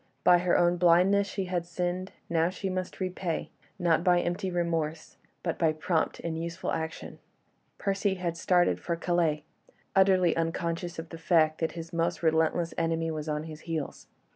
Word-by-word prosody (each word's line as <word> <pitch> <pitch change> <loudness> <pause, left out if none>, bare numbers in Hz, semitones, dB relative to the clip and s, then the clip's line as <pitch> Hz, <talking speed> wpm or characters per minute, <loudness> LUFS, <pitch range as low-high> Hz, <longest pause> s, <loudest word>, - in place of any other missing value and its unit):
By 175 -1 +6
her 180 0 +2
own 175 0 +3
blindness 180 +4 +4
she 195 0 -3
had 180 -1 -1
sinned; 180 +2 -3 0.2
now 165 0 +2
she 190 +1 -4
must 185 0 -4
repay, 185 -3 -3 0.3
not 170 -3 +2
by 180 -1 +4
empty 175 +3 -2
remorse, 165 -3 -2 0.3
but 170 - -2
by 160 -2 +3
prompt 160 +1 -1
and 165 -1 -3
useful 170 +2 -4
action. 160 +1 -4 0.6
Percy 195 0 0
had 175 -2 -3
started 175 +1 +2
for 170 - -2
Calais, 165 -3 0 0.5
utterly 190 -3 +4
unconscious 165 +1 -2
of 165 0 -6
the 165 - -9
fact 160 -2 +3
that 160 - -1
his 165 +1 -8
most 170 +1 -1
relentless 160 +1 +2
enemy 165 0 0
was 155 0 -4
on 150 0 -1
his 155 -1 -8
heels. 160 -3 -4
170 Hz, 165 wpm, -29 LUFS, 165-180 Hz, 0.6 s, By